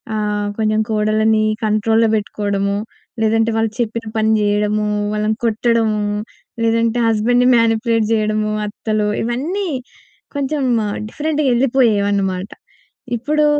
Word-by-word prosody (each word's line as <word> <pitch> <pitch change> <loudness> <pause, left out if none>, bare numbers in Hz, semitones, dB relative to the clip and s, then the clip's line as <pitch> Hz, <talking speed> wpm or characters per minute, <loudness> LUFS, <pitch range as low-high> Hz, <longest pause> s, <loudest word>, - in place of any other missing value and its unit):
ఆహ్, 210 -1 -1
కొంచెం 215 0 +1
కోడళ్ళని 215 0 +2 0.2
కంట్రోల్‌లో 220 +1 +2
బెట్టుకోవడము. 200 -1 -1 0.5
లేదంటే 225 +1 +2
వాళ్ళు 225 -1 +1
చెప్పిన 230 0 -3
పని 220 0 +2
జేయడము, 210 0 +1 0.3
వాళ్ళని 215 +1 0
కొట్టడము, 225 -1 +1 0.6
లేదంటే 230 +1 +1
హస్బెండ్‌ని 240 +3 +2
మానిప్యులేట్ 230 -1 +2
జేయడము 215 0 0 0.2
అత్తలు 215 0 -2 0.2
ఇవన్నీ 305 - -2 0.7
కొంచెం 285 0 -1 0.5
డిఫరెంట్‌గా 305 +2 -1
యెళ్ళిపోయేవన్నమాట. 205 -7 +1 0.7
ఇప్పుడు 300 +6 +1
220 Hz, 95 wpm, -18 LUFS, 210-230 Hz, 0.7 s, కోడళ్ళని